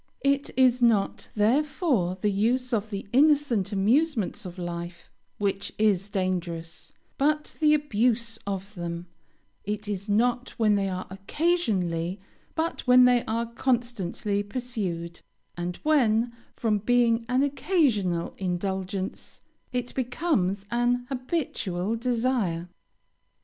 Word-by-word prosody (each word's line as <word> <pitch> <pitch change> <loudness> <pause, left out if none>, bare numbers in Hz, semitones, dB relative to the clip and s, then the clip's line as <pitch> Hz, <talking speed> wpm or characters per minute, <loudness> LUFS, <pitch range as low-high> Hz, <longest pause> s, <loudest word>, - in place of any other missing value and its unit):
It 280 0 +2
is 255 -1 +4
not, 225 -4 +2
therefore, 240 - +1
the 205 +2 +1
use 245 +5 +1
of 220 -1 0
the 200 -2 -5
innocent 275 -8 +3
amusements 225 - +1
of 180 +1 -10
life 175 0 -6 0.3
which 200 -1 -1
is 205 -2 +2
dangerous, 175 -4 -3 0.3
but 300 +2 +1
the 305 -1 +5
abuse 235 -4 0
of 195 +1 -4
them; 170 -2 -5 0.6
it 210 +1 -4
is 200 0 -4
not 245 +4 +1
when 220 -3 +3
they 200 -1 +1
are 185 0 -4
occasionally, 195 - 0 0.4
but 325 +1 -1
when 250 0 +8
they 245 -1 +4
are 230 +1 -1
constantly 235 -5 -1
pursued; 200 -7 -4 0.3
and 175 0 -3
when, 240 -6 +3 0.2
from 215 -3 +1
being 235 +1 +3
an 255 +2 +3
occasional 260 - +1
indulgence, 190 +1 -3 0.3
it 245 -1 -3
becomes 245 - 0
an 245 +1 +1
habitual 245 - -2
desire. 230 -8 0
220 Hz, 115 wpm, -26 LUFS, 190-250 Hz, 0.6 s, when